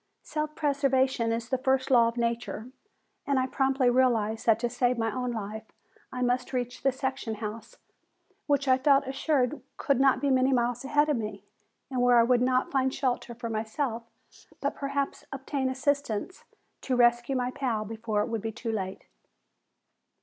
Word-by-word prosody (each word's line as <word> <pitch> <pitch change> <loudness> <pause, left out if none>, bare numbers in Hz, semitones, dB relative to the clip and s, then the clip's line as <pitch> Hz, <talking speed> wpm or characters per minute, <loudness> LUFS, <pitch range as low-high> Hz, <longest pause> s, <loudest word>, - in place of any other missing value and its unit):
Self 305 0 -3
preservation 265 -5 +1
is 230 0 -2
the 260 - 0
first 265 0 +1
law 235 -2 +6
of 230 +1 -4
nature, 235 0 -2 0.6
and 280 -1 +2
I 260 - +2
promptly 265 0 +1
realized 235 -4 +2
that 225 -1 +6
to 240 - +1
save 245 +1 0
my 225 -2 -1
own 250 -1 -2
life 220 0 -6 0.4
I 250 -1 -2
must 250 +1 0
reach 245 0 -3
the 270 - +3
section 265 -3 -3
house, 215 +1 -7 0.7
which 285 -1 +1
I 260 0 +4
felt 275 0 +4
assured 270 0 0 0.2
could 275 -3 +1
not 270 -1 +4
be 280 -1 +1
many 260 +1 +3
miles 245 0 0
ahead 295 +2 +2
of 295 - +2
me, 215 -2 -5 0.5
and 255 -2 0
where 245 -1 +5
I 230 - +7
would 245 0 +3
not 255 0 +3
only - - -17
find 265 -1 +1
shelter 250 -3 -2
for 235 0 -5
myself, 225 +2 -2 0.6
but - - -1
perhaps 280 0 -3
obtain 270 0 -2
assistance 280 - -2 0.4
to 260 - -1
rescue 240 +2 +3
my 250 -1 -1
pal 235 -6 -2
before 220 -1 -2
it - - -4
would 225 -2 -3
be 225 - -3
too 230 +1 -4
late. 190 -3 -4
250 Hz, 180 wpm, -28 LUFS, 230-270 Hz, 0.7 s, I